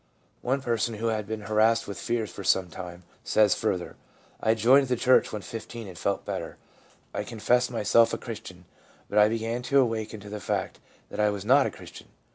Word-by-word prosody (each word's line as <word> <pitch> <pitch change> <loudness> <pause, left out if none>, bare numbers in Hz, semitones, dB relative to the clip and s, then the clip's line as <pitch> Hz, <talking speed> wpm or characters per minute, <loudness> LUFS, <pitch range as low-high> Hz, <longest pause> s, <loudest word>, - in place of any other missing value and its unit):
One 135 +2 -1
person, 115 -1 0
who 115 +2 -1
had 105 -2 -2
been 110 0 -4
harassed 110 +2 +2
with 100 - -6
fears 115 -2 -2
for 100 - -8
some 90 -2 +2
time, 90 -1 -8 0.2
says 105 -3 +4
further: 95 -5 -2 0.2
' - - -30
I 110 +1 +3
joined 130 +5 +5
the 125 - +1
church 125 +2 +3
when 105 -2 -5
15, 115 +3 -7
and 95 - -10
felt 100 +3 -2
better. - - -5 0.6
I - - -2
con 115 - -9
fessed 125 +3 +2
myself 115 0 +3
a - - -1
Christian, 100 -6 -9 0.5
but 105 - +3
I 105 0 +6
began 115 +2 -2
to 140 +2 +3
awaken 110 -3 -1
to 105 - -10
the 105 0 -5
fact - - -3 0.3
that - - -7
I 105 0 +4
was 100 -1 -4
not 135 +4 +5
a - - -2
Christian. - - -12
110 Hz, 210 wpm, -27 LUFS, 105-120 Hz, 0.6 s, I